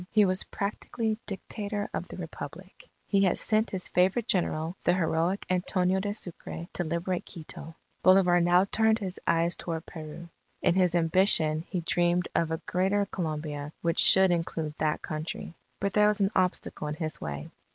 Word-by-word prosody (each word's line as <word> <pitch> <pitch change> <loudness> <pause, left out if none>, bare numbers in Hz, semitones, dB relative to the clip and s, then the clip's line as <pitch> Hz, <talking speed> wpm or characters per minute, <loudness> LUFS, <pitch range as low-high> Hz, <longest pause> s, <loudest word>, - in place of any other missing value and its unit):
He 210 -2 +5
was 185 0 +1
practically 215 +2 -3
Dictator 205 +1 -3
of - - -3
the - - -9
Republic. 175 +2 -9 0.2
He 195 -1 +3
had 185 - +2
sent 215 +1 +2
his 185 -2 -3
favourite 190 +6 +2
General, 165 -2 0
the 175 - +3
heroic 170 +2 0
Antonio 185 +1 +1
de 205 +1 -2
Sucre, 175 -4 -5
to - - -1
liberate 170 +2 -2
Quito. 165 0 -8 0.3
Bolivar 185 -2 +5
now 175 +2 +4
turned 220 +2 +2
his 190 -4 -5
eyes 170 +1 +2
toward 165 -1 -5
Peru. 160 +1 -9 0.4
In - - +4
his 180 -2 +2
ambition 165 -2 +3
he 180 - -2
dreamed 175 +1 +2
of 165 -1 +1
a 160 0 -3
Greater 195 +3 +1
Colombia 150 -3 -4
which 170 -1 +1
should 190 -1 +6
include 165 -2 -2
that 155 -1 0
country. 155 +2 -5 0.3
But 200 -1 -1
there 210 0 +5
was 210 0 +1
an 195 0 +2
obstacle 180 -4 0
in 150 - -3
his 155 -1 -4
way. 75 -1 -5
180 Hz, 170 wpm, -28 LUFS, 165-195 Hz, 0.4 s, should